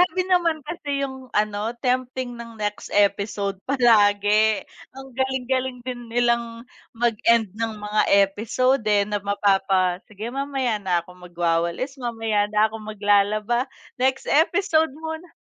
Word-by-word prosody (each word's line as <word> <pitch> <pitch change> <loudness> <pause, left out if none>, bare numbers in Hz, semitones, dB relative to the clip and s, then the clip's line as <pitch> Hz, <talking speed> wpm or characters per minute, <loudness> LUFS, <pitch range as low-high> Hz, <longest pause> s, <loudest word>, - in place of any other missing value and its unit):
Grabe 370 - -2
naman 335 -4 +2
kasi 285 -5 -3
'yung 265 -1 -5
ano 210 +2 0
tempting 255 -1 -1
ng 230 -1 -9
next 210 -1 -4
episode 200 -1 +1
palagi 215 -4 +4 0.3
ang 270 0 -10
galing-galing 260 -1 -2
din 245 -2 -6
nilang 235 0 0 0.3
mag-end 230 -2 +2
ng 225 -1 -2
mga 210 0 0 0.3
episode, 235 +4 0
eh, 205 -1 +4
na 205 0 -2
mapapa, 195 -2 +1
"Sige, 215 +1 -7
mamaya 270 -4 -1
na 180 -3 0
ako 180 - -17 0.2
magwawalis, 175 +9 -1
mamaya 225 -4 -1
na 210 +1 +2
ako 225 - -7
maglalaba, 215 +3 +1 0.3
next 265 +1 0
episode 320 -1 +2
muna." 320 +2 -7
230 Hz, 130 wpm, -23 LUFS, 205-260 Hz, 0.3 s, palagi